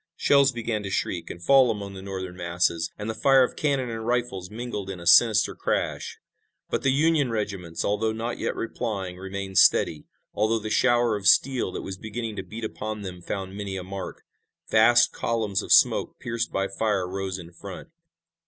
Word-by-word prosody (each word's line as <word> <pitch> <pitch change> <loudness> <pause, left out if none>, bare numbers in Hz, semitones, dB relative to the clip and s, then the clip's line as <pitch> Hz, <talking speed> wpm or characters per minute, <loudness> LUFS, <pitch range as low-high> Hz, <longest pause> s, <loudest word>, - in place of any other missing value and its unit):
Shells 140 -1 +4
began 115 -3 -3
to 100 - -5
shriek 90 -2 -2
and 85 - -8
fall 135 -2 +6
among 100 -2 -4
the 95 - -8
Northern 95 -2 -6
masses, 85 -2 -1
and 105 - -5
the 110 - -2
fire 135 +3 +5
of 125 - -2
cannon 135 -5 0
and 115 0 -5
rifles 120 -6 -2
mingled 110 -3 -5
in 95 -2 -6
a 85 - -10
sinister 110 +4 +5
crash. - - -2 0.5
But - - 0
the 135 - +2
Union 150 -1 +2
regiments, 100 -7 -3
although 105 +2 0
not 115 +2 -4
yet - - -2
replying, 105 -6 -4
remained 95 0 -2
steady, 75 -2 +4 0.3
although 110 +2 +1
the 110 0 -5
shower 120 -1 +3
of 100 -2 -2
steel 125 +2 +3
that - - -5
was 95 -1 -6
beginning 110 +2 -5
to - - -2
beat 115 +2 -9
upon 110 -1 -5
them 90 -2 -7
found 95 +1 -5
many 100 -1 -4
a 95 - -5
mark. 95 +1 -7 0.5
Vast 120 +2 +5
columns 110 -4 -1
of - - -7
smoke - - +4
pierced 115 -1 -3
by 95 0 -1
fire 100 -2 -1
rose 95 0 -4
in 85 -2 -10
front. 95 - -10
105 Hz, 190 wpm, -25 LUFS, 95-115 Hz, 0.5 s, fall